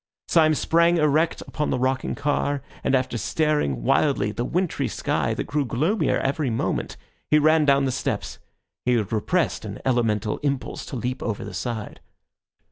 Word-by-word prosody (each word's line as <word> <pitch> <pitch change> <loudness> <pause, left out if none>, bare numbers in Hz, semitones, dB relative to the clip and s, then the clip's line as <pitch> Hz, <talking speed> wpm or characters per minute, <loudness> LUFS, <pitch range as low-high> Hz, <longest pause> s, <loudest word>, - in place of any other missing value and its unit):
Syme 155 -2 +4
sprang 170 +3 +3
erect 155 +1 +2
upon 150 - -3
the - - 0
rocking 130 +1 0
car, 145 -1 -1 0.2
and 135 - +2
after 125 -2 -1
staring 150 - 0
wildly 110 - +2
at - - -14
the 120 - 0
wintry 180 +3 -1
sky, - - -1
that - - -2
grew 145 +1 -1
gloomier 155 - +1
every 140 0 -1
moment, 115 - -2 0.3
he 150 - +5
ran 155 +1 +4
down 140 -1 +4
the 130 - 0
steps. - - -3 0.4
He 125 - +2
had 110 -2 -1
repressed 165 - 0
an 105 -1 -6
elemental 115 -5 +1
impulse 140 -3 -3
to - - -6
leap 125 +1 -3
over 110 -4 -3
the - - -8
side. 115 -4 -4
135 Hz, 170 wpm, -24 LUFS, 120-155 Hz, 0.4 s, he